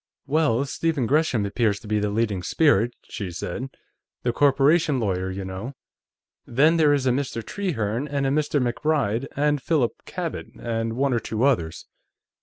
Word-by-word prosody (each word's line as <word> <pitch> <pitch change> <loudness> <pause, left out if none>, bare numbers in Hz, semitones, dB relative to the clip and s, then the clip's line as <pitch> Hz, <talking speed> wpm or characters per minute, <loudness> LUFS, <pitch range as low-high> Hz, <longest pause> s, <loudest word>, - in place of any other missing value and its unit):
"Well, 140 -3 +2
Stephen 150 -1 -1
Gresham 135 -5 +2
appears 105 0 0
to - - -12
be 105 0 +1
the 105 0 0
leading 105 -3 0
spirit," 120 - +2
she 100 -3 -6
said. 90 +9 -5 0.5
"The 120 - 0
corporation 145 +2 +3
lawyer, 95 -4 -1
you 95 +1 -5
know. 95 +8 -6 0.7
Then, 150 +7 +4
there 155 -2 +5
is 140 -2 +1
a 130 - +4
Mr. 125 -3 -2
Trehearne, 140 - -2
and 140 -1 -1
a 135 - +1
Mr. 145 0 +1
MacBride, 125 -1 0
and 145 0 +1
Philip 135 -4 +1 0.2
Cabot, - - -4
and 115 -1 -2
one 135 +2 +1
or 120 - +2
two 110 +1 -3
others." 100 -13 +1
125 Hz, 165 wpm, -24 LUFS, 110-145 Hz, 0.7 s, there